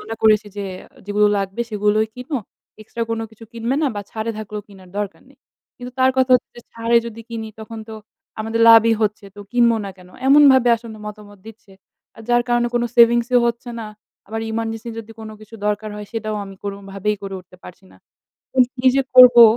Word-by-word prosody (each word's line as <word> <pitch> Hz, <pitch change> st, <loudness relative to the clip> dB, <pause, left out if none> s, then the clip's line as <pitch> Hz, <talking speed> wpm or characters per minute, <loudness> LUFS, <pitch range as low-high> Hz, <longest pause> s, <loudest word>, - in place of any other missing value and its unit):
মনে 220 Hz, +1 st, -6 dB
করেছি 215 Hz, -1 st, +4 dB
যে 200 Hz, -, -3 dB, 0.4 s
যেইগুলো 210 Hz, 0 st, +3 dB
লাগবে 195 Hz, +3 st, -4 dB
সেগুলোই 210 Hz, +1 st, +1 dB
কিনো। 255 Hz, +3 st, -4 dB, 0.4 s
এক্সট্রা 230 Hz, +2 st, -5 dB
কোনো 225 Hz, 0 st, -2 dB
কিছু 220 Hz, +1 st, -14 dB
কিনবে 235 Hz, +3 st, -2 dB
না 295 Hz, -, +3 dB
বা 205 Hz, -, -3 dB
ছাড়ে 220 Hz, +1 st, -3 dB
থাকলেও 210 Hz, -1 st, -6 dB
কিনার 190 Hz, -2 st, -16 dB
দরকার 205 Hz, -1 st, -4 dB
নেই। -, -, -23 dB, 0.4 s
কিন্তু 250 Hz, 0 st, -9 dB
তার 260 Hz, 0 st, +5 dB
কথা 260 Hz, 0 st, +2 dB
হচ্ছে 240 Hz, -, -12 dB
ছাড়ে 230 Hz, +1 st, +1 dB
যদি 230 Hz, 0 st, -8 dB
কিনি 225 Hz, -1 st, -5 dB
তখন 220 Hz, +1 st, -8 dB
তো 220 Hz, -, -7 dB, 0.5 s
আমাদের 225 Hz, +1 st, -2 dB
লাভই 225 Hz, 0 st, +7 dB
হচ্ছে। 210 Hz, -1 st, -1 dB
তো -, -, -9 dB
কিনব 240 Hz, -1 st, +4 dB, 0.2 s
না -, -, -5 dB
কেন? 180 Hz, 0 st, -16 dB, 0.2 s
এমনভাবে 270 Hz, -3 st, +6 dB
আসলে 225 Hz, -1 st, -11 dB
মতামত 205 Hz, -1 st, -10 dB
দিচ্ছে। 220 Hz, -2 st, -14 dB, 0.4 s
আর 225 Hz, -, -11 dB
যার 240 Hz, 0 st, +3 dB
কারণে 240 Hz, 0 st, +2 dB
কোন 240 Hz, -, +2 dB
সেভিংসও 235 Hz, +1 st, +5 dB
হচ্ছে 235 Hz, +1 st, -3 dB
না, 220 Hz, -, -6 dB, 0.4 s
আবার 225 Hz, +2 st, -4 dB
ইমার্জেন্সি 225 Hz, 0 st, -4 dB
যদি 225 Hz, 0 st, -9 dB
কোনো 215 Hz, 0 st, -8 dB
কিছু 215 Hz, +1 st, -14 dB
দরকার 210 Hz, +1 st, -1 dB
হয় 210 Hz, -1 st, -7 dB
সেইটাও 215 Hz, -1 st, -3 dB
আমি 195 Hz, 0 st, -10 dB
কোনোভাবেই 200 Hz, +1 st, -3 dB
করে 195 Hz, -1 st, -6 dB
উঠতে 180 Hz, 0 st, -19 dB
পারছি 180 Hz, +2 st, -13 dB
না। -, -, -19 dB, 0.6 s
তো -, -, -17 dB, 0.2 s
কি 255 Hz, +1 st, -2 dB
যে 275 Hz, -, +3 dB
করবো 245 Hz, -2 st, +10 dB
225 Hz, 195 wpm, -20 LUFS, 210-235 Hz, 0.6 s, করবো